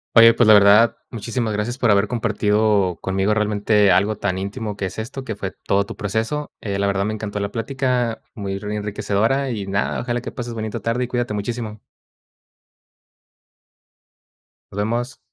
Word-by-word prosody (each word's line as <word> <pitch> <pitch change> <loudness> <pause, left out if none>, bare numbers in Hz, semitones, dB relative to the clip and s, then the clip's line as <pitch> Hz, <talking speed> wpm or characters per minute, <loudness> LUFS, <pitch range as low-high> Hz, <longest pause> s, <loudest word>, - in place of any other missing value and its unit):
Oye, 115 0 +8
pues, 120 - +4
la 110 - +8
verdad, 105 +3 +6
muchísimas 115 -1 -3
gracias 110 +5 -3
por 120 - +2
haber 100 0 +4
compartido 105 -5 +1
conmigo 95 +2 0
realmente 105 -1 +2
algo 100 +4 +3
tan 100 -2 -2
íntimo 105 +2 -4
que 100 - -2
es 95 +3 -5
esto, 130 +4 -5
que 110 -5 -5
fue 100 -2 -4
todo 100 0 +1
tu - - -7
proceso. 110 +8 -2
Eh, 100 -2 -3
la 100 - 0
verdad, 100 -1 +1
me 110 +1 -2
encantó 105 -1 -4
la 100 0 -2
plática, 125 -1 -1
muy 100 -3 -4
ri 105 +1 -4
enriquecedora 105 +6 0
y, 105 -5 -3
nada, 100 +1 -1
ojalá 120 0 -2
que - - -6
pases 120 -1 -6
bonita 110 0 -4
tarde 115 +4 0
y - - -8
cuídate 120 -2 -2
muchísimo. 110 +1 -4 2.9
Nos 95 - -9
vemos. 120 +5 -2
105 Hz, 170 wpm, -21 LUFS, 100-115 Hz, 2.9 s, Oye